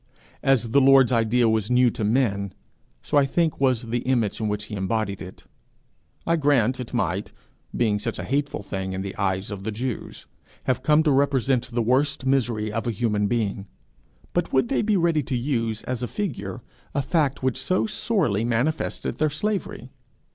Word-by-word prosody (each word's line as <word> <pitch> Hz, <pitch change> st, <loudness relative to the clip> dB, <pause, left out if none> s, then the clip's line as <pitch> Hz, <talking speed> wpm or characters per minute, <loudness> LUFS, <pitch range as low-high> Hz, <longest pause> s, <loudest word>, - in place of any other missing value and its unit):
As 125 Hz, -4 st, +2 dB
the 140 Hz, +3 st, +5 dB
Lord's 135 Hz, -2 st, +6 dB
idea 115 Hz, 0 st, +3 dB
was 110 Hz, -2 st, +1 dB
new 125 Hz, -1 st, +4 dB
to 110 Hz, -, -4 dB
men, 105 Hz, -4 st, +1 dB, 0.5 s
so 145 Hz, -, +3 dB
I 140 Hz, -, +3 dB
think 160 Hz, 0 st, 0 dB
was 130 Hz, -3 st, +2 dB
the 120 Hz, +1 st, -2 dB
image 120 Hz, -4 st, 0 dB
in 110 Hz, -, 0 dB
which 105 Hz, 0 st, -2 dB
he 105 Hz, -, -9 dB
embodied 100 Hz, 0 st, -2 dB
it. 95 Hz, 0 st, -10 dB, 0.8 s
I 170 Hz, 0 st, +2 dB
grant 130 Hz, -5 st, +2 dB
it 125 Hz, -, -6 dB
might, -, -, -1 dB, 0.5 s
being 105 Hz, -4 st, +2 dB
such 115 Hz, +2 st, -3 dB
a -, -, -4 dB
hateful 140 Hz, -5 st, -2 dB
thing 95 Hz, -1 st, -4 dB
in 95 Hz, 0 st, -3 dB
the 100 Hz, 0 st, -6 dB
eyes 95 Hz, 0 st, -1 dB
of 100 Hz, -1 st, -5 dB
the 110 Hz, -, -2 dB
Jews, 120 Hz, +2 st, -5 dB, 0.4 s
have 130 Hz, 0 st, 0 dB
come 150 Hz, +3 st, +4 dB
to 155 Hz, -, +3 dB
represent 135 Hz, -2 st, +2 dB
the 120 Hz, -1 st, -1 dB
worst 130 Hz, +2 st, +1 dB
misery 120 Hz, -5 st, +1 dB
of 115 Hz, +1 st, -3 dB
a -, -, +1 dB
human 105 Hz, -2 st, 0 dB
being; 105 Hz, -3 st, -1 dB, 0.7 s
but -, -, 0 dB
would 130 Hz, -3 st, +2 dB
they -, -, +1 dB
be 215 Hz, -2 st, +2 dB
ready 170 Hz, -3 st, +2 dB
to 135 Hz, -3 st, -2 dB
use 115 Hz, -4 st, -1 dB
as 125 Hz, -2 st, -3 dB
a 125 Hz, -, -1 dB
figure 115 Hz, -, -4 dB, 0.3 s
a 140 Hz, -, +1 dB
fact 140 Hz, -3 st, 0 dB
which 130 Hz, -2 st, 0 dB
so 185 Hz, 0 st, +1 dB
sorely 195 Hz, -, 0 dB
manifested 120 Hz, +7 st, -1 dB
their 155 Hz, 0 st, +3 dB
slavery? 155 Hz, -, -3 dB
120 Hz, 185 wpm, -24 LUFS, 110-140 Hz, 0.8 s, Lord's